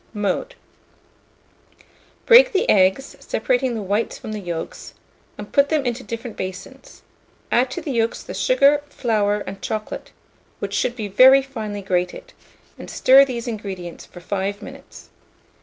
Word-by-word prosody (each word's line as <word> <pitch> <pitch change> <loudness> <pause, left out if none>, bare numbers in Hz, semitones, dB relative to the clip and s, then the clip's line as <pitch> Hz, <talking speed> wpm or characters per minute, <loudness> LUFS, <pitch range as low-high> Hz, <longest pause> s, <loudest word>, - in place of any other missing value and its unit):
Mode. 210 - -2 1.7
Break - - +7
the 380 - +1
eggs, 190 +7 +2
separating 250 +1 -1
the 215 - -4
whites 205 +4 -1
from 215 - -8
the 215 - -4
yolks, 170 -4 -7 0.4
and - - -9
put 280 -1 +4
them 305 -4 0
into 245 +1 -2
different 230 0 -7
basins; 190 - -8 0.5
add 250 +2 +3
to 350 - -5
the 295 - -4
yolks 230 -2 -1
the - - -8
sugar, 290 - +3
flour, 210 -6 0
and 195 0 -8
chocolate, 215 -1 -5 0.5
which - - -5
should 245 - 0
be 220 -4 -4
very 260 +7 +6
finely 215 -7 -6
grated, 185 - -2 0.5
and - - -9
stir 270 +2 +6
these 245 -3 -5
ingredients 195 -6 -6
for 175 - -14
5 200 +2 -3
minutes. - - -13
225 Hz, 145 wpm, -21 LUFS, 200-270 Hz, 1.7 s, Break